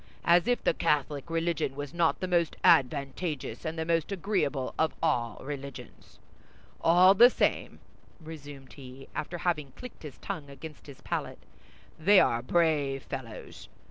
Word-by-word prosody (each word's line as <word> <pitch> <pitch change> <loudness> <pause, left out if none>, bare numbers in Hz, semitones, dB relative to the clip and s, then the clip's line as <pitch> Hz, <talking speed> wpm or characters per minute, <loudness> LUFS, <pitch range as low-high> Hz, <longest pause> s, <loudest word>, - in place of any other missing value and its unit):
As 175 +4 +4
if 245 0 +1
the - - +2
Catholic 145 +1 -1
religion 165 -4 -1
was 145 +1 -6
not 170 -1 +1
the 185 - -1
most 170 -3 +1
advantageous 140 -1 +1
and 160 +1 -4
the 160 - -2
most 165 +2 0
agreeable 165 -9 -1
of 160 - +1
all 120 -9 0
religions! 140 -3 -9 0.7
All 180 +3 +6
the 240 +5 +8
same," - - -1 0.4
resumed 145 -4 -11
he, 135 -1 -12
after 175 +3 -4
having 155 -6 -2
clicked 250 -1 -11
his 150 -4 -9
tongue 160 -8 -6
against 150 +2 -11
his 140 -2 -12
palate, - - -4 0.6
"they 195 +5 +6
are 115 -7 +2
brave 145 -2 +1
fellows! 130 -5 -8
155 Hz, 145 wpm, -29 LUFS, 135-170 Hz, 0.7 s, the